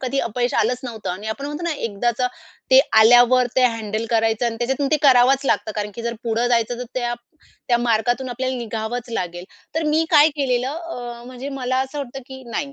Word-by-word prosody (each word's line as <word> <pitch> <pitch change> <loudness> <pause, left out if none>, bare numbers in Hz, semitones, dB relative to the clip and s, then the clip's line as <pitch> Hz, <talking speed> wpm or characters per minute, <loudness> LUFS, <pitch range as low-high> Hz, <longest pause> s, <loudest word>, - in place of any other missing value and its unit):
कधी 265 +1 -1
अपयश 245 +2 -2
आलंच 250 0 +1
नव्हतं 225 -4 -5
आणि 190 +4 -6
आपण 245 +6 -4
म्हणतो 295 +3 -5
ना 340 - 0
एकदाचं 240 0 -1 0.4
ते 260 0 +8 0.2
आल्यावर 245 +2 +6
ते 260 - +5
हँडल 225 -2 -1
करायचं 225 0 +1
आणि 230 -1 -2
त्याच्यातून 265 +4 -1
ते 310 - +4
करावंच 265 0 +5
लागतं. 220 -4 0
कारण 210 0 -2
की 235 - -7
जर 235 0 -2
पुढं 230 +1 0
जायचं 235 0 +1
तर 250 - -4
त्या 240 -1 -1 0.5
त्या 240 -1 +3
मार्गातून 240 +2 0
आपल्याला 260 +1 -3
निघावंच 235 +1 -4
लागेल. 175 -5 -4 0.3
तर 320 - 0
मी 320 +1 +3
काय 300 -2 +7
केलेलं 255 -3 0
अ, 250 -7 -7
म्हणजे 255 +2 -7
मला 255 0 -1
असं 290 +3 -8
होता 270 -1 -5
की 265 -1 -10
"नाही 275 +4 -3
245 Hz, 200 wpm, -21 LUFS, 230-265 Hz, 0.5 s, ते